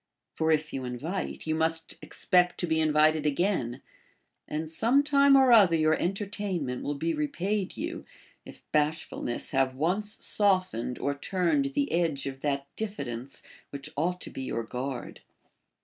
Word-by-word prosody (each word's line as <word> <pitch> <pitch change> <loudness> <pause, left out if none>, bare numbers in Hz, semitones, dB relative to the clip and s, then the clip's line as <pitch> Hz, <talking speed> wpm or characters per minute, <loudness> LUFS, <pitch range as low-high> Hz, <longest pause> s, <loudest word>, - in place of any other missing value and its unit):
For 160 0 +1
if 155 0 0
you 135 - -3
invite, 140 +10 -4
you 155 - 0
must 160 0 0
expect 180 -1 +2
to - - +1
be 160 -1 +1
invited 155 0 +3
again; 140 - 0 0.6
and 155 +1 -3
some 230 - +2
time 280 -1 +5
or 265 -2 +6
other 200 -8 +7
your 155 -1 +3
entertainment 190 -7 -2
will 145 - -2
be 165 +4 -1
repaid 185 +6 -2
you, 335 +3 -4 0.4
if - - -13
bashfulness 150 -5 -1
have 130 -1 +1
once 195 +9 -1
softened 185 - +1
or 140 - -1
turned 185 - 0
the 285 0 0
edge 165 -5 +1
of 135 -1 -5
that 140 -1 -1
diffidence 135 - -5 0.3
which 140 -1 -8
ought 180 +5 0
to - - -5
be - - -6
your 115 -3 -3
guard. 125 +3 -5
160 Hz, 150 wpm, -28 LUFS, 140-195 Hz, 0.6 s, other